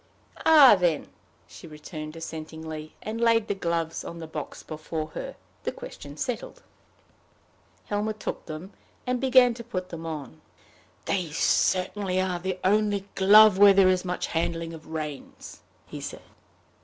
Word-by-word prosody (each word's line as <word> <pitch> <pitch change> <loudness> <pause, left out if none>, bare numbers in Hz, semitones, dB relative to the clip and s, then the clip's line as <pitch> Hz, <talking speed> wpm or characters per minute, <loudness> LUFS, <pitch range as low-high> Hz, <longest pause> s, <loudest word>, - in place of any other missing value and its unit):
"Ah, 295 -8 +9
then!" 170 -4 0 0.4
she - - -13
returned, 155 0 -8
assentingly, 160 -1 -7
and 225 +2 -4
laid 230 -2 +3
the - - 0
gloves 170 -3 -2
on 170 - -8
the 165 - -7
box 155 -2 -7
before 155 0 -5
her, - - -7 0.3
the - - -1
question - - -10
settled. - - -5 1.2
Helmer 210 +1 -1
took 215 - -6
them, 160 +5 -8 0.3
and 250 0 -1
began 255 -2 +5
to 235 0 -9
put 185 -6 -5
them 165 -1 -7
on. 145 - -7 0.6
"They 180 -4 -1
certainly 185 +4 +1
are 185 -2 -1
the 185 +1 -3
only 205 0 +2
glove 205 +1 +7
where 200 -1 +9
there 190 -1 +6
is 185 -1 +1
much 180 -1 -2
handling 165 0 -2
of 160 -1 -11
reins," 155 -3 -7 0.2
he - - -9
said. - - -7
180 Hz, 145 wpm, -26 LUFS, 160-210 Hz, 1.2 s, Ah